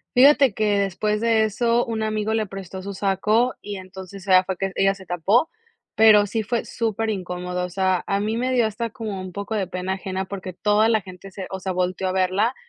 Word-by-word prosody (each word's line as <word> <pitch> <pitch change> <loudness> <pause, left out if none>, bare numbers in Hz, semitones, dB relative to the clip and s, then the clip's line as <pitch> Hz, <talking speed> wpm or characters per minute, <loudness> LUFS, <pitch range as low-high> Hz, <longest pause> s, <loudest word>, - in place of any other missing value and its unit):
Fíjate 275 -2 +6
que, 210 -2 +1
después 210 +2 -1
de 225 -1 +3
eso, 235 +3 +1
un 225 -1 -3
amigo 215 0 -1
le 220 -1 0
prestó 190 -1 -8
su 200 +1 -6
saco, 210 +6 +1
y 205 -1 -6
entonces 190 +1 -10
ella 185 0 +6
fue 185 -1 -4
que 195 -1 -2
ella 195 0 +2
se 190 -1 -13
tapó, 195 - +2 0.5
pero 215 -2 +7
sí 220 +3 -2
fue 230 +2 -2
súper 225 -1 -2
incómodo, 180 -2 -4
o - - -7
sea, 185 0 0
a 200 0 +1
mí 215 +2 -1
me 255 +2 -1
dio 240 -3 +3
hasta 225 +2 -3
como 215 -5 -5
un 185 -1 -7
poco 200 +3 -5
de 200 -3 -1
pena 185 +1 -3
ajena, 190 0 -4
porque 185 -1 -6
toda 210 +3 +2
la 220 -2 +2
gente 185 +1 -11
se 190 -1 -7
o 190 - -4
sea, 190 0 -3
volteó 185 +1 -1
a - - 0
verla, 190 +6 +1
200 Hz, 220 wpm, -23 LUFS, 185-220 Hz, 0.5 s, pero